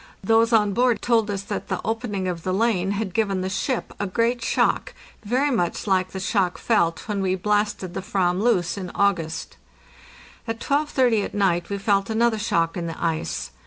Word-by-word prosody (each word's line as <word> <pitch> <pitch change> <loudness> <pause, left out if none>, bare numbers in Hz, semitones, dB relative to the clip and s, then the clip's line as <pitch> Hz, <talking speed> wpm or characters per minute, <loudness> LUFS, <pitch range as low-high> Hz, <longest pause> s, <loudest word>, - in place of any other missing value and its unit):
Those 225 +3 +3
on 210 -3 +3
board 245 +1 +2
told 225 -3 +2
us 200 -1 -2
that - - -5
the - - -2
opening 220 -4 -2
of 175 -2 -3
the 185 +2 -1
lane 195 -4 +1
had 200 -3 -3
given 200 -4 0
the 185 +1 -3
ship 225 +6 -2
a 205 - -1
great 235 +5 0
shock, - - +1 0.3
very 255 +7 +1
much 175 -9 -1
like 185 -2 +1
the 190 - -6
shock 190 -2 0
felt 170 -8 +1
when 205 -2 -1
we 190 -1 +1
blasted 205 -1 -1
the - - -3
/vam 190 -3 0
loose 200 -5 +1
in 185 -2 -5
August. 165 -5 0 0.9
At 225 0 -3
12.30 260 -6 +2
at - - -8
night 180 -4 +1
we 200 - -2
felt 200 0 +1
another 225 0 +2
shock 165 -6 0
in 170 -2 -3
the 165 - -6
ice. 165 -1 -2
200 Hz, 190 wpm, -23 LUFS, 185-225 Hz, 0.9 s, Those